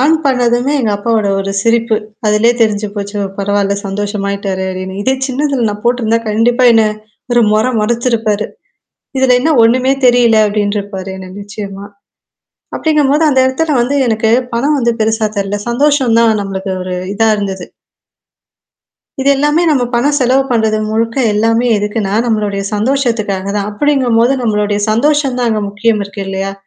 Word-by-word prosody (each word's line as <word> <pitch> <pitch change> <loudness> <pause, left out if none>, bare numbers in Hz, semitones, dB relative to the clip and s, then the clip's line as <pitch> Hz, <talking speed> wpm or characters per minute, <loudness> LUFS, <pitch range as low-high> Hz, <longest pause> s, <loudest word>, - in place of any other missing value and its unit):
On 300 +5 +4
பண்ணதுமே 250 0 +1
எங்க 220 -4 0
அப்பாவோட 215 0 0
ஒரு 195 0 -3
சிரிப்பு. 230 -1 +1 0.3
அதிலேயே 210 +3 +3
தெரிஞ்சு 215 -2 +1
போச்சு. 205 0 -5 0.2
பரவால்ல 200 0 0
சந்தோஷமாயிட்டாரு 200 -1 -3
அப்பிடின்னு. 190 +1 -5
இதே 265 +5 +1
சின்னதுல 275 -2 -1
நான் 210 0 -6
போட்டருந்தா 235 -2 +1
கண்டிப்பா 235 +4 +2
என்ன 225 -1 +4 0.5
ஒரு 240 - +4
மொர 215 +1 +2 0.2
மொரச்சிருப்பாரு. 225 -2 0 0.7
இதுல 260 -1 +4
என்ன 310 +6 +1
ஒன்னுமே 255 +3 +3
தெரியல 240 -2 +4
அப்பிடின்ருப்பாரு. 205 -2 -2
என்ன 185 -1 -9
நிச்சயமா. 200 -1 -8 0.9
அப்பிடிங்கும்போது 300 -1 +1
அந்த 265 - +1
இடத்துல 295 +3 0
வந்து 245 +4 0
எனக்கு 220 0 +1 0.2
பணம் 280 +6 +1
வந்து 235 -2 +1
பெருசா 220 0 +1
தெர்ல. 200 +1 -2
சந்தோஷம் 265 -1 +2
தான் 225 -2 +3
நம்மளுக்கு 195 0 -4
ஒரு 185 0 -4 0.2
இதா 225 +2 +2
இருந்தது. 195 -3 -4 1.5
இது 270 - +1
எல்லாமே 295 +4 +1
நம்ம 270 -4 +2
பணம் 285 +5 +2
செலவு 260 0 +2
பண்றது 220 -2 +1
முழுக்க 230 +2 -1 0.2
எல்லாமே 225 +3 +1
எதுக்குன்னா, 205 -1 -2
நம்மளுடைய 210 -3 -1
சந்தோஷத்துக்காக 220 -5 -1
தான். 205 0 -2
அப்பிடிங்கும்போது 255 0 +2
நம்மளுடைய 210 -2 0
சந்தோஷம் 275 +3 +1
தான் 245 -1 +1
அங்க 215 -1 -1
முக்கியம் 210 0 0
இருக்கு 200 0 -7
இல்லயா! 195 0 -3
225 Hz, 140 wpm, -13 LUFS, 205-250 Hz, 1.5 s, On